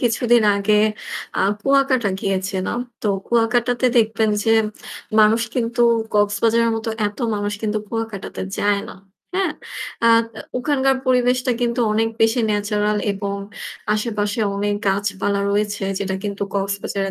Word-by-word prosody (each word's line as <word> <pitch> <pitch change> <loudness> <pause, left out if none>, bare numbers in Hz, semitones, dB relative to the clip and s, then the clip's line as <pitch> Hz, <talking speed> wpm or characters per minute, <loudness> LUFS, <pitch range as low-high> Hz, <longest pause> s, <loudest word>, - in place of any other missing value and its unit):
কিছুদিন 240 0 +3
আগে 200 +1 +2 0.6
আ - - +1 0.2
কুয়াকাটা 270 -2 +2
গিয়েছিলাম। 190 +1 -1 0.2
তো - - -1 0.2
কুয়াকাটাতে 240 +2 +2
দেখবেন 220 -1 +3
যে 225 - +2 0.7
মানুষ 215 +2 +5
কিন্তু 240 -1 -1 0.3
কক্সবাজারের 225 +3 +2
মতো 225 0 -4 0.2
এত 205 - -6 0.2
মানুষ 205 0 -2
কিন্তু 215 -1 0
কুয়াকাটাতে 225 -3 -5 0.2
যায় 205 -1 +2
না। - - -9 0.4
হ্যাঁ? 375 -5 +1 0.5
আ - - +6 0.5
ওখানকার 270 0 +2
পরিবেশটা 250 0 +2
কিন্তু 240 0 0
অনেক 225 +1 +2
বেশি 225 +2 +3
ন্যাচারাল 210 0 0
এবং 200 0 -3 0.6
আশেপাশে 210 -1 -1 0.2
অনেক 205 +1 0
গাছপালা 200 0 0
রয়েছে 205 0 -1
যেটা 190 -1 -2
কিন্তু 200 -1 -3
কক্সবাজারে 200 0 -2
215 Hz, 125 wpm, -21 LUFS, 205-235 Hz, 0.7 s, আ